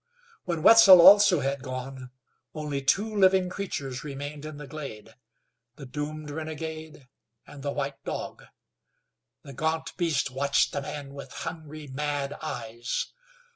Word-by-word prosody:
When 170 -3 -3
Wetzel 215 -5 +9
also 195 -2 +8
had 135 0 -2
gone, 130 0 -7 0.5
only 150 -3 -3
two 210 +10 +1
living 190 -2 +4
creatures 140 -10 -5
remained 145 +1 -7
in 155 -1 -7
the 150 - -8
glade 135 -7 -9 0.6
the 140 - -10
doomed 150 +3 -5
renegade, 155 -2 -7 0.4
and 145 - -12
the 140 - -3
white 140 0 -4
dog. - - -6 1.0
The 140 - -10
gaunt 160 +3 -2
beast 160 -6 0
watched 140 +2 +1
the - - -2
man 140 0 -7
with 140 -2 -9
hungry, 155 -1 -7
mad 145 0 -3
eyes. 120 -6 -4
145 Hz, 135 wpm, -27 LUFS, 135-160 Hz, 1.0 s, Wetzel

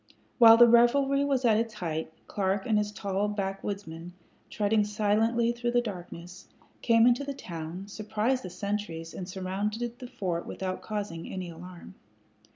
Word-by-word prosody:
While 225 -1 +9
the 240 0 +8
revelry 270 +4 +4
was 270 -3 0
at 220 -2 +4
its 230 -1 -3
height, 160 -5 -4
Clark 195 -1 -1
and 215 -2 +2
his 210 0 -2
tall 200 -1 -2
backwoodsmen, 195 -4 -5 0.4
treading 210 0 +1
silently 215 +3 +1
through 240 0 -2
the 245 - +4
darkness, 180 -4 -8 0.3
came 230 -1 +5
into 245 +3 +3
the 280 0 -5
town, 170 - -7
surprised 220 +5 -1
the 185 - -7
sentries, 180 -3 -4
and 185 0 -6
surrounded 210 +6 -3
the 250 - -7
fort 175 -7 -3
without 185 -1 -4
causing 205 -6 -5
any 185 -2 -5
alarm. 175 +1 -11
205 Hz, 155 wpm, -28 LUFS, 185-230 Hz, 0.4 s, While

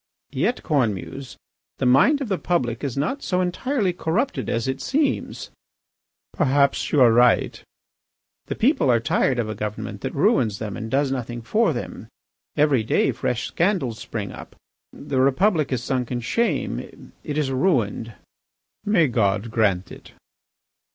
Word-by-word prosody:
"Yet, 250 - -1
Cornemuse, 130 - -2 0.4
the - - -1
mind 140 - +4
of 270 - -2
the 190 -3 -1
public 120 -10 -1
is 140 -2 -3
not 160 - -1
so 180 -8 -1
entirely 190 +3 0
corrupted 185 +11 -1
as 115 +2 -1
it 130 0 -2
seems." 280 0 -1 0.8
"Perhaps 140 0 +2
you 150 - +3
are 120 -2 +7
right." 120 -1 +3 0.8
"The - - -3
people 265 - +2
are 120 -2 +4
tired 125 +3 +1
of 120 -2 -1
a 110 - -3
government 105 0 -5
that - - -4
ruins 105 -3 +2
them 105 -2 -5
and 115 -1 -6
does 135 +1 +1
nothing 120 -2 -4
for 220 - +2
them. - - -6 0.5
Every 145 -5 +3
day 110 - +2
fresh 125 0 -2
scandals 170 - 0
spring 105 -4 -5
up. - - -11 0.4
The 140 -2 -3
Republic 155 +3 +2
is 125 -2 -1
sunk 125 -2 -2
in 120 -1 -2
shame. 230 - -2
It 150 -2 -4
is 145 -3 0
ruined." 120 - 0 0.7
"May 205 -6 +3
God 110 -2 0
grant 100 -6 +1
it!" - - -13
135 Hz, 150 wpm, -23 LUFS, 115-175 Hz, 0.8 s, are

